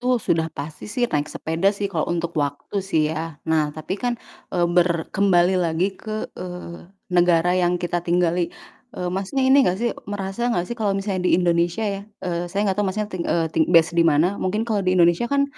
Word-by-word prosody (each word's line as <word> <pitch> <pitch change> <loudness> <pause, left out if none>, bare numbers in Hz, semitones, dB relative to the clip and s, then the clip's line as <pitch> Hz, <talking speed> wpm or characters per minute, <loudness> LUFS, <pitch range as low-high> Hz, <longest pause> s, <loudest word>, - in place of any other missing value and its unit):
Itu 250 0 +2
sudah 165 -6 0
pasti 150 +6 -7
sih, 240 +4 0
naik 150 0 0
sepeda 165 +5 0
sih, 205 - -3
kalo 160 -3 -1
untuk 170 0 -2
waktu 145 +7 -2
sih 160 -5 0
ya. 160 -1 -5
Nah 160 -2 +1
tapi 155 +6 -5
kan, 245 -1 -1 0.3
eee, 175 -1 +1
ber 170 -1 +1
kembali 185 -2 +3
lagi 170 +3 0
ke, 215 +2 -5 0.2
eee, 180 -1 -8 0.2
negara 175 0 +4
yang 180 -1 +2
kita 175 0 -2
tinggali, 175 0 +1 0.5
eee, 180 - -2
Masnya 195 +8 -1
ini 265 +2 +6
gak 185 -8 +2
sih, 235 +3 -1 0.2
merasa 205 +3 -2
gak 175 -8 0
sih 210 - -6
kalo 210 -4 -1
misalnya 195 -2 -1
di - - +5
Indonesia 175 +3 +1
ya, 200 -2 -2 0.2
eee, 175 0 -2
saya 200 +2 0
gak 200 - -2
tau - - +1
Masnya 210 +2 -3
ting 180 -2 -3
eee, 165 -2 0
ting 160 - +2
based 165 -1 +5
di 170 - +2
mana. 165 +4 +3
Mungkin 210 +4 0
kalo 220 -3 0
di 185 -1 +1
Indonesia 175 +6 +3
kan 280 +1 +2
180 Hz, 210 wpm, -22 LUFS, 170-200 Hz, 0.5 s, ini